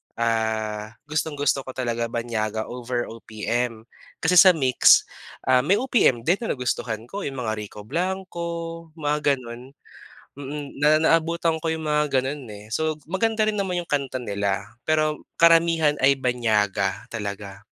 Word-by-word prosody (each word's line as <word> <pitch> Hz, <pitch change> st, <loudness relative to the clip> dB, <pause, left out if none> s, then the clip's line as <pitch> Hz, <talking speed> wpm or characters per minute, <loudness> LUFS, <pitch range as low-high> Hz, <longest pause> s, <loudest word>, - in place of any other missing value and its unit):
ah, 110 Hz, -2 st, -1 dB, 0.2 s
gustong-gusto 145 Hz, -3 st, -1 dB
ko -, -, -4 dB
talaga 120 Hz, -2 st, -1 dB
banyaga 110 Hz, -2 st, -2 dB
over 120 Hz, 0 st, -3 dB
OPM. 115 Hz, +1 st, -3 dB, 0.4 s
Kasi 180 Hz, +2 st, +4 dB
sa 185 Hz, -1 st, +9 dB
MYX 130 Hz, -4 st, +5 dB, 0.5 s
ah, 130 Hz, -1 st, +6 dB
may 195 Hz, -, +4 dB
OPM 235 Hz, -, +2 dB
din 180 Hz, +4 st, +3 dB
na 230 Hz, -, -3 dB
nagustuhan 120 Hz, -3 st, -3 dB
ko, 200 Hz, -, -5 dB
yung 135 Hz, -, -4 dB
mga 110 Hz, 0 st, -2 dB
Rico 105 Hz, 0 st, -9 dB
Blanco, 170 Hz, -, -4 dB
mga 150 Hz, -1 st, +1 dB
ganun. 120 Hz, 0 st, -10 dB, 0.7 s
Mm, 145 Hz, 0 st, -7 dB
na 145 Hz, +2 st, +3 dB
naabutan 165 Hz, 0 st, +2 dB
ko 160 Hz, -, +1 dB
yung 160 Hz, -1 st, -4 dB
mga 150 Hz, -3 st, +2 dB
ganun 135 Hz, +1 st, -5 dB
eh. 105 Hz, +1 st, -11 dB
So 155 Hz, +5 st, -1 dB
maganda 215 Hz, +3 st, +1 dB
rin 210 Hz, -, -1 dB
naman 185 Hz, -3 st, -1 dB
yung 170 Hz, -, -10 dB
kanta 135 Hz, -3 st, -1 dB
nila, 100 Hz, -3 st, -1 dB, 0.2 s
pero 155 Hz, -1 st, 0 dB, 0.2 s
karamihan 165 Hz, -2 st, +5 dB
ay 140 Hz, -, +7 dB
banyaga 110 Hz, -4 st, 0 dB
talaga. 100 Hz, -2 st, -6 dB
135 Hz, 145 wpm, -24 LUFS, 115-160 Hz, 0.7 s, sa